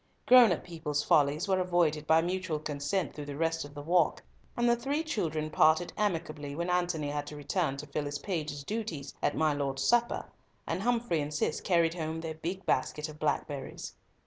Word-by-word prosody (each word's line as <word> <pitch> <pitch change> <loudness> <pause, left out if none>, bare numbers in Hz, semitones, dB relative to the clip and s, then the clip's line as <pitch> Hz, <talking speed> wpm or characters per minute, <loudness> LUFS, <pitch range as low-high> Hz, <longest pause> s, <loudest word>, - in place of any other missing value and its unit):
Grown 245 -5 +8
up 175 - -1
people's 155 -4 -3
follies 150 +4 +3
were 190 -1 +2
avoided 170 -4 +1
by 160 +1 +5
mutual 180 -2 -1
consent 150 +4 -2
through 150 -1 -7
the 140 -1 -5
rest 165 0 0
of 145 0 -11
the 145 - -6
walk, 170 0 +2 0.3
and 240 0 +2
the 240 - +5
three 275 +6 -1
children 160 - -2
parted 160 +3 +3
amicably 160 -8 -2
when 170 +3 -1
Antony 175 -4 0
had 145 0 -3
to 150 - -7
return 145 0 -1
to 150 - -6
fulfil 145 +1 -3
his 145 0 -3
page's 150 -4 -4
duties 165 -8 -4
at - - 0
my 155 -1 +3
lord's 135 -2 -2
supper, 240 +9 +2 0.4
and - - -2
Humfrey 230 -7 +1
and 145 +1 -4
Cis 150 - 0
carried 170 -3 +2
home 160 -1 -3
their 160 -1 -4
big 175 +5 -5
basket 150 +1 0
of 150 0 -11
blackberries. 145 -2 -3
160 Hz, 195 wpm, -30 LUFS, 145-180 Hz, 0.4 s, Grown